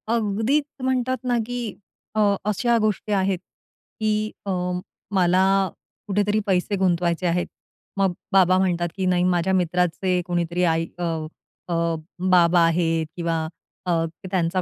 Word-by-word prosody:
अगदीच 225 Hz, +7 st, +1 dB, 0.2 s
म्हणतात 260 Hz, 0 st, +1 dB
ना 245 Hz, -1 st, +1 dB
की 240 Hz, -3 st, -4 dB, 0.4 s
अ, -, -, +1 dB, 0.3 s
अशा 235 Hz, +3 st, +2 dB
गोष्टी 210 Hz, 0 st, -1 dB
आहेत, 190 Hz, -1 st, +1 dB, 0.6 s
की 215 Hz, 0 st, 0 dB
अ, 200 Hz, -, -1 dB, 0.6 s
मला 185 Hz, 0 st, +4 dB, 0.6 s
कुठेतरी 205 Hz, +1 st, +1 dB
पैसे 190 Hz, +2 st, +1 dB
गुंतवायचे 175 Hz, -2 st, +1 dB
आहेत, 175 Hz, +1 st, 0 dB, 0.5 s
मग 195 Hz, -2 st, +2 dB, 0.2 s
बाबा 185 Hz, -1 st, +5 dB
म्हणतात 175 Hz, -2 st, +1 dB
की 190 Hz, -, -1 dB
"नाही, 180 Hz, -1 st, +2 dB
माझ्या 180 Hz, +1 st, +2 dB
मित्राचे 180 Hz, +1 st, +1 dB
कोणीतरी 175 Hz, 0 st, -1 dB
आई 165 Hz, -1 st, +2 dB
अ, -, -, -2 dB, 0.6 s
अ, 175 Hz, -, -2 dB, 0.6 s
बाबा 175 Hz, -1 st, +5 dB
आहेत 165 Hz, -1 st, +1 dB
किंवा 165 Hz, -2 st, -1 dB, 0.4 s
अ, 180 Hz, -, 0 dB, 0.4 s
त्यांचा 185 Hz, 0 st, +1 dB
185 Hz, 125 wpm, -23 LUFS, 175-210 Hz, 0.6 s, बाबा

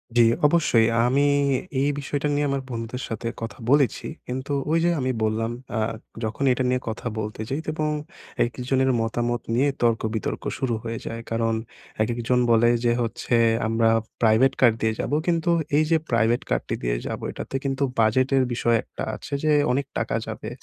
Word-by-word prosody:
জি, 120 Hz, -, +6 dB, 0.3 s
অবশ্যই 145 Hz, -8 st, +3 dB
আ -, -, +3 dB
আমি 140 Hz, +3 st, +3 dB, 0.6 s
এই 145 Hz, -, +2 dB
বিষয়টা 145 Hz, +1 st, -2 dB
নিয়ে 145 Hz, 0 st, +1 dB
আমার 135 Hz, -1 st, -1 dB
বন্ধুদের 120 Hz, +1 st, -5 dB
সাথে 115 Hz, +1 st, -4 dB
কথা 115 Hz, -, -5 dB
বলেছি। 140 Hz, -4 st, +3 dB, 0.2 s
কিন্তু 130 Hz, +3 st, -4 dB, 0.2 s
ওইযে 165 Hz, +1 st, +3 dB
আমি 130 Hz, 0 st, 0 dB
বললাম 110 Hz, +1 st, 0 dB, 0.3 s
আ -, -, +1 dB, 0.4 s
যখন 110 Hz, +5 st, -2 dB
এটা 130 Hz, +1 st, +1 dB
নিয়ে 125 Hz, 0 st, +1 dB
কথা 110 Hz, +2 st, -5 dB
বলতে 110 Hz, 0 st, -4 dB
যাই 135 Hz, -, -1 dB
এবং 155 Hz, -1 st, -1 dB, 0.6 s
একজনের 130 Hz, +3 st, 0 dB
মতামত 120 Hz, +1 st, -1 dB
নিয়ে 140 Hz, +4 st, +3 dB
তর্কবিতর্ক 110 Hz, -2 st, 0 dB
শুরু 130 Hz, -3 st, -1 dB
হয়ে 115 Hz, -1 st, -4 dB
যায়। 115 Hz, 0 st, -5 dB
কারণ 115 Hz, 0 st, +1 dB, 0.5 s
একেকজন 120 Hz, +2 st, 0 dB
বলে 115 Hz, +1 st, +5 dB, 0.2 s
যে 120 Hz, -, +4 dB
হচ্ছে 115 Hz, +1 st, -1 dB, 0.3 s
আমরা 115 Hz, 0 st, +2 dB, 0.3 s
প্রাইভেট 115 Hz, +4 st, +4 dB
কার 120 Hz, -, +7 dB
দিয়ে 110 Hz, 0 st, +2 dB
যাবো, 145 Hz, -, -1 dB
কিন্তু 170 Hz, 0 st, +1 dB, 0.3 s
এইযে 155 Hz, +2 st, +3 dB
প্রাইভেট 115 Hz, 0 st, +2 dB
কারটি -, -, -1 dB
দিয়ে -, -, 0 dB
যাবো, -, -, -5 dB
এটাতে -, -, -7 dB
কিন্তু 135 Hz, 0 st, -1 dB, 0.2 s
বাজেটের 130 Hz, +4 st, +3 dB
বিষয় 120 Hz, 0 st, +2 dB
একটা -, -, -7 dB
আছে -, -, -9 dB
যে 155 Hz, -, +3 dB, 0.2 s
অনেক 135 Hz, +2 st, 0 dB
টাকা -, -, -1 dB
যাবে, -, -, -6 dB
120 Hz, 165 wpm, -24 LUFS, 115-135 Hz, 0.6 s, কার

